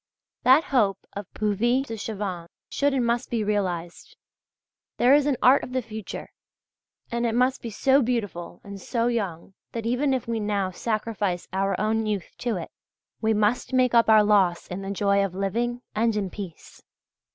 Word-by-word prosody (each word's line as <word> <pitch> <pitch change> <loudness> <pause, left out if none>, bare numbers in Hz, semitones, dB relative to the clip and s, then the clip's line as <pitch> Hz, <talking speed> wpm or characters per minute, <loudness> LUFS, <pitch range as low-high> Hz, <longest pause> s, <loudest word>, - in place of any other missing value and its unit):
That 265 +5 +6
hope 205 -7 +2
of 200 -2 -7
Puvis 235 +5 +1
de 225 - -5
Chavannes' 200 -5 -5 0.2
should 285 0 +1
and 260 -3 +1
must 235 +1 0
be 230 -2 0
realized: 180 -5 -3 0.8
there 245 +3 +5
is 290 0 +4
an 280 -4 +1
art 255 +4 +6
of 250 - -7
the 260 - +1
future, 220 -2 -7 0.8
and 235 0 -1
it 230 -1 0
must 255 +2 +2
be 235 - -5
so 270 +6 +3
beautiful 205 -9 -3
and 200 -1 -9
so 230 +2 -1
young 195 -7 -2 0.2
that 230 -1 -4
even 250 +4 +1
if 255 - -4
we 230 -1 -1
now 205 -3 -1
sacrifice 210 -3 -2
our 195 +1 0
own 220 +1 0
youth 205 -4 -3
to 235 -5 -1
it, 170 - -7 0.5
we 220 -1 +2
must 215 +5 +1
make 255 -1 +3
up 230 -1 +5
our 215 -1 +7
loss 195 -5 +3
in 180 +2 -5
the 195 - -5
joy 200 0 +2
of 190 -2 -3
living 235 +5 -2
and 225 0 +1
in 195 -3 -2
peace. 190 -6 -9
215 Hz, 180 wpm, -25 LUFS, 195-240 Hz, 0.8 s, our